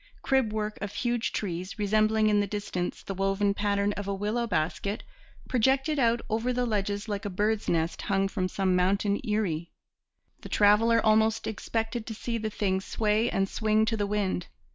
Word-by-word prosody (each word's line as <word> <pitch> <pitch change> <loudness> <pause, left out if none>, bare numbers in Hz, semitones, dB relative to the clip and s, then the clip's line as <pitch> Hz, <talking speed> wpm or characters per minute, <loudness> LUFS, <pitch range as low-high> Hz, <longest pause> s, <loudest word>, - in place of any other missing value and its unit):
Crib 265 -5 +2
work 215 0 -3
of 205 0 -3
huge 240 -2 -1
trees, 185 0 -4
resembling 215 +1 +2
in 210 -1 +3
the 205 - +1
distance 195 -3 -4
the 195 - -4
woven 195 +1 +1
pattern 205 0 0
of 205 -1 -5
a 200 - -1
willow 215 +4 -1
basket, 180 +3 -1 0.4
projected 270 +5 +2
out 235 -2 +3
over 230 +3 0
the 250 0 0
ledges 205 -1 -1
like 205 -2 -3
a 205 - -3
bird's 210 +3 0
nest 165 0 0
hung 195 -1 +1
from 190 -2 -2
some 185 0 0
mountain 200 +3 +1
eyrie. 195 -8 -1 0.7
The - - -10
traveller 225 +3 +4
almost 220 0 +3
expected 225 +1 -3
to 220 - -5
see 230 +1 -3
the 220 0 -2
thing 190 -3 0
sway 215 +3 +1
and 195 0 0
swing 215 +1 +1
to 225 0 0
the 205 -2 -1
wind. 200 -4 -1
210 Hz, 180 wpm, -28 LUFS, 195-220 Hz, 0.7 s, traveller